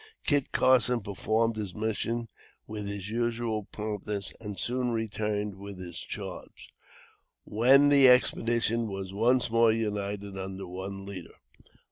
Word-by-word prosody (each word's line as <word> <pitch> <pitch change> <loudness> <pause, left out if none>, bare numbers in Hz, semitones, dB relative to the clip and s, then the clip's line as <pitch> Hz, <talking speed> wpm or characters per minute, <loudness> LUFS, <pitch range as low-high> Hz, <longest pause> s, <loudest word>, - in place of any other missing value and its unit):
Kit 145 -2 +1
Carson 125 -1 +4
performed 110 +3 0
his 100 -4 -4
mission 110 +2 -2 0.4
with 105 -1 -5
his 100 0 -5
usual 115 -2 -1
promptness 105 -1 -4
and 105 -3 -6
soon 125 +5 -1
returned 105 -3 -2
with 100 -1 -8
his 90 -2 -7
charge, - - -8 0.7
when 135 +6 +5
the 140 -2 +7
expedition 115 -2 +3
was 95 -1 -5
once 120 +3 +2
more 115 0 +5
united 100 -2 -3
under 95 0 -5
one 95 +2 -6
leader. 95 -4 -8
105 Hz, 125 wpm, -29 LUFS, 100-115 Hz, 0.7 s, the